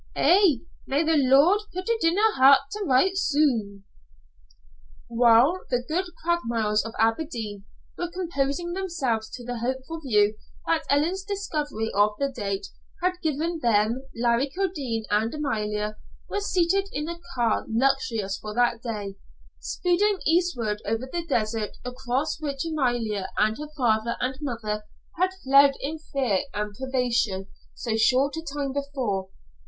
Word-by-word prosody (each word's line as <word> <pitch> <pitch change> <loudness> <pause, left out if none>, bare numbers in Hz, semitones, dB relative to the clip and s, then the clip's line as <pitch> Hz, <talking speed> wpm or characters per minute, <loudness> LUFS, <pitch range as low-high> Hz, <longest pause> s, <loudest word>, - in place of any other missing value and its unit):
"An' 350 - +4 0.2
may 280 +4 +2
the 320 0 +2
Lord 285 +8 +5
pit 370 +1 -5
it 460 -4 0
in 330 +3 +3
her 435 +1 +4
hairt 275 0 +8
to 420 0 -3
write 370 +7 +3
soon!" 240 - +1 1.2
While 240 +8 +5
the 245 -1 0
good 360 +4 0 0.2
Craigmiles 230 -11 +1
of 225 +1 -7
Aberdeen 225 -4 -1 0.3
were 350 - -2
composing 345 -2 -2
themselves 275 -13 -2
to 245 - -10
the 245 -1 -4
hopeful 260 +7 -3
view 210 -6 +2 0.3
that 330 -1 0
Ellen's 330 +7 +1
discovery 300 - -3
of 205 +1 +3
the 280 0 0
date 200 -6 -3 0.4
had 365 0 0
given 320 +2 -1
them, 230 -1 +2
Larry 235 +3 +1
Kildene 285 - -2
and 215 +2 +2
Amalia 210 -7 -2 0.3
were 410 - -2
seated 390 +1 +1
in 300 +1 -3
a 340 0 -5 0.2
car, 235 -3 +1
luxurious 225 -4 0
for 210 0 -7
that 240 -1 +2
day, 205 -5 -5 0.4
speeding 385 +3 +1
eastward 285 - +1
over 225 +4 -2
the 340 -1 -3
desert 215 -5 -1
across 255 +4 -2
which 280 -1 -3
Amalia 240 -10 -1
and 215 +1 +3
her 300 0 -6
father 235 -2 +1
and 255 +1 -1
mother 220 -6 -3 0.4
had 370 +1 +4
fled 275 +1 +6
in 310 +3 -4
fear 260 -10 0 0.2
and 210 0 -2
privation 240 -6 -1 0.3
so 230 -3 -2
short 255 +6 +3
a 320 - -4
time 285 -3 -4
before. 260 -9 -2
265 Hz, 145 wpm, -25 LUFS, 225-320 Hz, 1.2 s, hairt